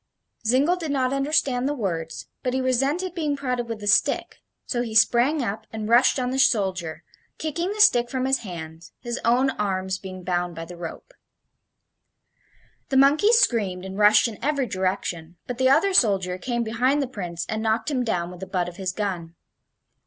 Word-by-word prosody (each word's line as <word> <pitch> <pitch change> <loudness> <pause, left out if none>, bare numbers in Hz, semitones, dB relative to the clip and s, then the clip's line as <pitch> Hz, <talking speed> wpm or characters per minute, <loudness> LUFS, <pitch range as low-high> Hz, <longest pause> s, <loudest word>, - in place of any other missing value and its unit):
Zingle 280 +9 +3
did 325 -3 -5
not 265 -2 0
understand 275 -2 +1
the 290 - -2
words, 165 - -4 0.2
but 250 0 -2
he - - +1
resented 275 +8 0
being 305 -5 -2
prodded 250 -3 -3
with 225 -2 -4
the 205 - -8
stick, 205 - +2 0.3
so 240 - -1
he 225 -3 -5
sprang 250 +6 +4
up 220 -1 -4
and 220 -1 -5
rushed 240 +5 +4
on 250 -1 -1
the 265 - -1
soldier, 190 -10 +1 0.3
kicking 335 +4 -2
the 425 - -6
stick 245 - +5
from 260 0 -2
his 265 0 +2
hands, 165 -4 -9
his 240 0 -4
own 250 +3 +3
arms 190 -3 -2
being 185 -1 -9
bound 175 -1 -2
by 165 0 -6
the 175 +1 -10
rope. 175 - -9 1.8
The 270 - +1
monkeys 305 - +5
screamed 200 - +1
and 190 0 -7
rushed 210 +2 +5
in 220 -3 -9
every 280 -2 +1
direction, 185 -4 -3
but 245 0 -6
the 260 0 +4
other 330 +8 +3
soldier 190 - +3
came 240 +2 -2
behind 245 +6 +1
the - - -4
Prince 175 -8 -5
and 220 0 -3
knocked 225 +4 0
him 255 -3 0
down 180 -7 -2
with 180 - -11
the 190 - -7
butt 180 -2 -1
of 175 0 -9
his 190 -2 -2
gun. 180 -5 -4
230 Hz, 190 wpm, -24 LUFS, 185-265 Hz, 1.8 s, stick